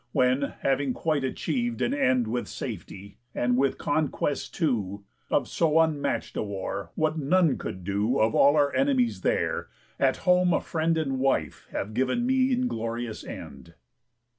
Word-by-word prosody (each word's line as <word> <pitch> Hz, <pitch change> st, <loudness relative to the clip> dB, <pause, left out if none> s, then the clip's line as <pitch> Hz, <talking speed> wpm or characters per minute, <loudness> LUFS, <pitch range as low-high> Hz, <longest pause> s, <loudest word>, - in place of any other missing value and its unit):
When, 130 Hz, +2 st, +2 dB
having 135 Hz, -1 st, +1 dB
quite 155 Hz, -3 st, 0 dB
achiev'd 240 Hz, -, -2 dB
An 245 Hz, -, +1 dB
end 130 Hz, -, +2 dB
with 120 Hz, +2 st, -2 dB
safety, 100 Hz, +1 st, -7 dB, 0.2 s
and 125 Hz, 0 st, +1 dB
with 135 Hz, +2 st, +1 dB
conquest, 145 Hz, -1 st, -1 dB
too, 105 Hz, -, -1 dB, 0.3 s
Of -, -, +1 dB
so 160 Hz, -1 st, +2 dB
unmatch'd 160 Hz, -3 st, 0 dB
a -, -, -1 dB
war, 100 Hz, -1 st, -4 dB
what 155 Hz, 0 st, 0 dB
none 165 Hz, +2 st, +3 dB
could 95 Hz, -, -6 dB
do 100 Hz, +6 st, 0 dB
Of 110 Hz, +1 st, +3 dB
all 140 Hz, +2 st, +5 dB
our 145 Hz, -2 st, +3 dB
enemies 265 Hz, -4 st, +1 dB
there, -, -, 0 dB, 0.3 s
at -, -, +3 dB
home 180 Hz, -1 st, +4 dB
a -, -, +3 dB
friend 165 Hz, 0 st, 0 dB
And 135 Hz, -4 st, -1 dB
wife 130 Hz, -, 0 dB
have 105 Hz, +2 st, -4 dB
giv'n 130 Hz, -, 0 dB
me 260 Hz, +1 st, +2 dB
inglorious 115 Hz, -, -2 dB
end?" 85 Hz, 0 st, -10 dB
140 Hz, 155 wpm, -27 LUFS, 115-165 Hz, 0.3 s, all